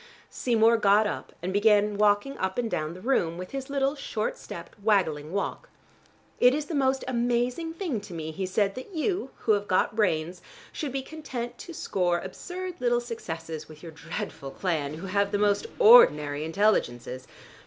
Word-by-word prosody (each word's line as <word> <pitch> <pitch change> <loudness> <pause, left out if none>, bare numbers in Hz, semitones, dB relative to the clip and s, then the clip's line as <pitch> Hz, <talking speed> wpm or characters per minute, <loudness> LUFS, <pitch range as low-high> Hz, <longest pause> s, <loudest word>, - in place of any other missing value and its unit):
Seymour 230 -1 +3
got 210 0 +4
up 210 - -4
and 185 +1 -2
began 210 0 +4
walking 210 +6 +2
up 190 0 -2
and 235 -2 -1
down 155 +1 -2
the 185 - -11
room 175 -10 +1
with 180 0 -7
his 270 -1 -5
little 275 0 +1
short 235 -7 -3
stepped, 170 +5 -10
waggling 165 -8 +1
walk. 200 - -3 0.7
"It 250 +2 +6
is 300 0 -2
the 330 - -6
most 270 -2 +1
amazing 245 +6 0
thing 330 - -3
to 200 -3 -10
me," 160 -1 -4
he 185 +3 -3
said, 195 +1 +1
"that 260 - -9
you, 325 -2 -1
who 225 - +2
have 205 -1 +1
got 185 +2 +1
brains, 175 -4 0 0.3
should 295 -4 -4
be 270 0 -3
content 255 -6 -6
to 340 - -8
score 180 -8 0
absurd 360 - -6
little 240 -1 +2
successes 165 -10 -6
with 155 +1 -13
your 165 - -8
dreadful 160 -2 -6
clan, 155 -3 -2
who 165 +5 -7
have 200 +1 0
the 205 - +1
most 205 - +2
ordinary 150 - +6
intelligences. 130 - 0
210 Hz, 175 wpm, -27 LUFS, 175-260 Hz, 0.7 s, It